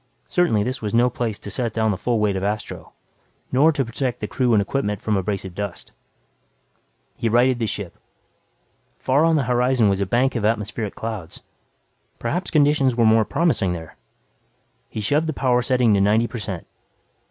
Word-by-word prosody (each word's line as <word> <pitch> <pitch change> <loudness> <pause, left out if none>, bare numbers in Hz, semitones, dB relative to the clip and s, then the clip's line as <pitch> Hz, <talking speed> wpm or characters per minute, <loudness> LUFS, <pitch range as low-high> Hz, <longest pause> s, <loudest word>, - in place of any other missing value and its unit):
Certainly 165 -13 +2
this 130 +2 -3
was 105 0 -2
no 120 +1 +4
place 115 -4 -3
to 100 - -8
set 115 0 -2
down 110 -1 +2
the - - -1
full 120 +3 0
weight 105 -2 +1
of 95 - -3
Astro 105 +1 -4 0.6
nor 145 +5 +5
to 140 -4 -1
protect 125 +2 -3
the - - -3
crew 125 +1 0
and 105 - +5
equipment 105 -1 -1
from 110 - -1
abrasive 95 -1 -3
dust. 100 -1 -6 1.2
He 115 - -1
righted 120 +2 +3
the 115 - 0
ship. 100 -4 -5 1.0
Far 135 +4 +2
on 165 0 +4
the 145 - +2
horizon 125 -2 +2
was 100 0 0
a 100 - 0
bank 125 +5 +1
of 115 - -1
atmospheric 105 -1 -1
clouds. 110 -7 -6 0.7
Perhaps 175 +10 -3
conditions 145 -4 +3
were 115 -1 +3
more 110 0 +4
promising 155 - +1
there. 80 -2 -8 0.9
He 110 - -5
shoved 145 +9 +1
the 155 - -1
power 125 -3 +2
setting 125 -3 +2
to 100 - +3
90 105 +4 +3
per 120 0 -6
cent. 95 -5 -5
115 Hz, 180 wpm, -22 LUFS, 105-130 Hz, 1.2 s, nor